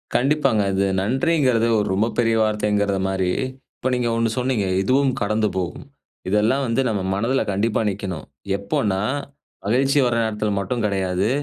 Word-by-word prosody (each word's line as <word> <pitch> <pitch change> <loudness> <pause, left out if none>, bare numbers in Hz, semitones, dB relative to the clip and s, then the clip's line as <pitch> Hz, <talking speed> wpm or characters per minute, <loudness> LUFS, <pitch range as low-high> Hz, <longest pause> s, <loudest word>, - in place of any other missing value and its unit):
கண்டிப்பாங்க. 135 -5 +2
அது 95 +1 +1 0.2
நன்றிங்குறது 130 - +2
ஒரு 105 - 0
ரொம்ப 105 +4 +2
பெரிய 115 -1 +3
வார்த்தைங்கிறத 105 -2 0
மாரி, 95 -1 0 0.5
இப்போ 130 - -1
நீங்க 120 -1 0
ஒண்ணு 115 0 +1
சொன்னீங்க, 125 -5 0 0.2
"இதுவும் 130 +5 +2
கடந்து 105 +1 +1
போகும்", 90 -2 -4 0.4
இதெல்லாம் 110 +7 +2
வந்து 115 +3 +1
நம்ம 105 -3 -1
மனதுல 115 +7 +1
கண்டிப்பா 105 +4 0
நிக்கணும். 95 -5 -5 0.3
எப்போனா, 100 -1 -1 0.7
மகிழ்ச்சி 135 +6 +2
வர 120 - +1
நேரத்துல 105 -1 -1
மட்டும் 110 +4 -2
கடையாது. 95 0 0
110 Hz, 140 wpm, -22 LUFS, 100-125 Hz, 0.7 s, பெரிய